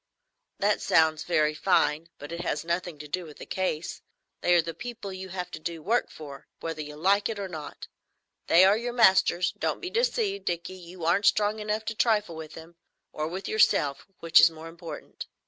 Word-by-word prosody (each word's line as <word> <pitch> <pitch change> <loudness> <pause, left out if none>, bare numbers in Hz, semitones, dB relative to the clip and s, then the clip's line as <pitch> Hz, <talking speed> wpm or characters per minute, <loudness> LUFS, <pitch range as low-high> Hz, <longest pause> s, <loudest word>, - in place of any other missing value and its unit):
"That 205 +1 +1
sounds 160 -1 +3
very 155 -3 +2
fine, 160 -1 +1
but 145 +2 -9
it 170 0 -4
has 170 - -2
nothing 170 -1 -2
to 150 +1 -9
do 180 +5 -3
with 155 -3 -12
the - - -9
case. 180 -4 -3 0.4
They 175 - +4
are 170 - +6
the 165 - -5
people 235 -3 -7
you 185 0 -7
have 180 0 -5
to - - -7
do 165 0 -5
work 235 +7 +1
for, 140 -3 -11
whether 165 -2 -4
you 150 0 -8
like 200 +6 +2
it 225 - -4
or 200 -1 -4
not. 155 -5 -8 0.6
They 175 +3 +7
are 195 +2 +5
your 240 +2 -3
masters. 190 -5 +4
Don't - - -1
be 365 -1 -6
deceived, 445 -4 0
Dickie, 175 +1 -3
you 180 -2 -9
aren't 180 +5 +3
strong 210 +1 +2
enough 215 +1 -2
to 225 - -2
trifle 210 -6 +1
with 160 -1 -8
them,—or 165 -1 -9
with 185 +4 -5
yourself, 145 -9 +2
which 165 0 +6
is - - +8
more 160 0 -10
important. 165 -2 -9
175 Hz, 200 wpm, -27 LUFS, 160-205 Hz, 0.6 s, is